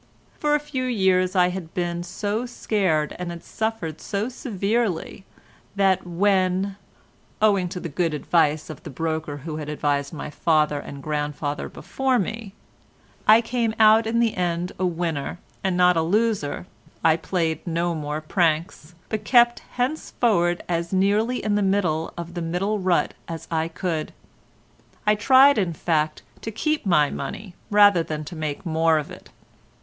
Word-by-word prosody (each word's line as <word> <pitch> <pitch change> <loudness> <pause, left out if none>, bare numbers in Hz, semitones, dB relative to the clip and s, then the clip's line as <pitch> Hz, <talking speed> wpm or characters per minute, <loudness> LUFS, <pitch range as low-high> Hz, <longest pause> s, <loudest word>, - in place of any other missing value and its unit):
For 295 0 +2
a - - +2
few 290 -3 -4
years 190 -6 +2
I 180 -1 +4
had 180 -3 -7
been 175 -1 -1
so 205 +6 -3
scared 185 -10 0
and 180 -1 -4
had 170 -1 -7
suffered 220 -8 -3
so 205 +3 -2
severely, 210 -5 -2 0.5
that 195 -2 +2
when 190 +1 +1 0.6
(owing 200 -4 +3
to 180 - -5
the 175 - -5
good 165 +1 -1
advice 155 0 +1
of 155 - -10
the - - -9
broker 155 0 -3
who 155 -2 -4
had 150 -1 -5
advised 145 -1 -1
my 150 -1 -6
father 150 -1 +2
and 140 -1 -9
grandfather 150 -1 -3
before 265 -1 -1
me) 215 -1 -4 0.7
I 220 +2 +8
came 230 -1 -1
out 220 +1 +6
in 230 +1 +1
the 230 -2 +2
end 175 0 -1
a 185 - +2
winner 165 -3 -2 0.3
and 185 -2 0
not 180 0 +5
a 165 - +2
loser, 200 -3 0 0.4
I 160 -1 +5
played 165 -1 -2
no 170 +1 0
more 150 -1 -3
pranks, 165 0 -1
but 220 -1 -3
kept 240 -1 +5
henceforward 235 - 0
as 170 -1 -2
nearly 205 +6 +1
in 210 - 0
the 205 - +2
middle 185 -5 +1
of 170 0 -6
the 175 - -4
middle 185 +6 -1
rut 185 -2 +1
as 165 -1 -7
I 160 0 0
could. 165 -1 -3 0.9
I 210 - +5
tried 265 +4 +6
in 180 -4 0
fact 155 -1 -1 0.2
to - - -4
keep 300 +3 -1
my 150 -5 +4
money 180 +7 -6 0.2
rather 205 -4 +6
than 155 -1 -4
to 170 - -8
make 155 +1 -4
more 160 -1 +3
of 150 - -4
it. - - -12
180 Hz, 160 wpm, -24 LUFS, 160-210 Hz, 0.9 s, I